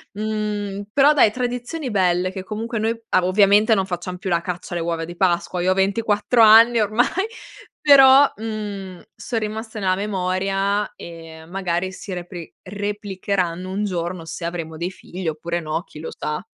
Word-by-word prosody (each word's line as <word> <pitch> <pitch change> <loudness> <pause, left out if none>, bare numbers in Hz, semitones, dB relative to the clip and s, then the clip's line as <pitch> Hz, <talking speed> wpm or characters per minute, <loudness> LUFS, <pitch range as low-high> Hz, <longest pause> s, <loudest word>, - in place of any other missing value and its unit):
Mhmm, 210 -1 -3
però 285 +2 +5
dai, 265 -7 +5
tradizioni 250 +5 -4
belle, 185 -3 +1
che 190 -1 -6
comunque 225 +4 -4
noi 220 +2 0
ah, 185 - +2
ovviamente 205 +3 +4
non 195 -2 +1
facciam 180 0 -5
più 190 - -5
la 170 -2 +1
caccia 175 0 -5
alle 170 - -2
uova 165 -1 -2
di 175 +1 -9
Pasqua. 175 -1 0
Io 185 - +3
ho - - +4
24 205 +4 +1
anni 225 +2 +7
ormai, 215 +3 +2 0.7
però, 275 -1 +7
mhmm, 205 -4 -6
son 230 - -3
rimaste 220 +1 -5
nella 185 -2 +1
memoria 195 +1 -1
e, 165 -1 -11
magari, 185 0 -2
si 190 +1 -8
repri 175 -1 -8
replicheranno 195 -3 -3
un 205 +2 -1
giorno, 175 -2 -3
se 165 +1 -6
avremo 165 -2 -5
dei 175 +3 -3
figli 185 -1 -8
oppure 170 +2 -3
no, 155 +1 -2
chi 150 - -15
lo 160 - -6
sa. 150 +5 -4
195 Hz, 165 wpm, -21 LUFS, 175-215 Hz, 0.7 s, anni